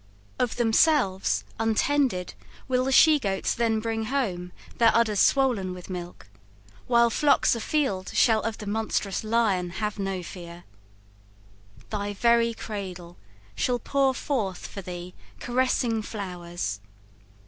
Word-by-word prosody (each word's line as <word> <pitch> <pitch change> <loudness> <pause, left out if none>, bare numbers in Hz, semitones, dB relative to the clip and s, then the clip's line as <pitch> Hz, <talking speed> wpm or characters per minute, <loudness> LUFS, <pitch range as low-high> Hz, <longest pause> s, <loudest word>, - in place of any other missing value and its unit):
Of 245 - 0
themselves, 230 -4 +2 0.2
Untended, 225 -3 +1 0.3
will 255 -1 +1
the 270 - 0
she 305 +2 +6
goats 195 -6 -1
then 225 -2 +1
bring 225 0 -2
home 195 -9 -2 0.3
Their 230 -1 +6
udders 220 -3 +2
swollen 235 -10 +2
with 180 +1 -10
milk, 175 -8 -7 0.6
while 235 -1 +4
flocks 290 +3 +3
afield 230 -6 -1
Shall 225 -2 +3
of 225 -1 -3
the 210 - -8
monstrous 205 -2 -2
lion 215 -5 +1
have 210 +3 -4
no 195 -2 -2
fear. 175 -1 -10 1.3
Thy 205 -1 -3
very 235 +1 +3
cradle 185 -6 -7 0.4
shall 245 - 0
pour 270 +2 +1
forth 215 -10 -2
for 200 - -7
thee 180 0 -8 0.3
Caressing 245 -2 0
flowers. 175 - -5
220 Hz, 125 wpm, -26 LUFS, 185-240 Hz, 1.3 s, she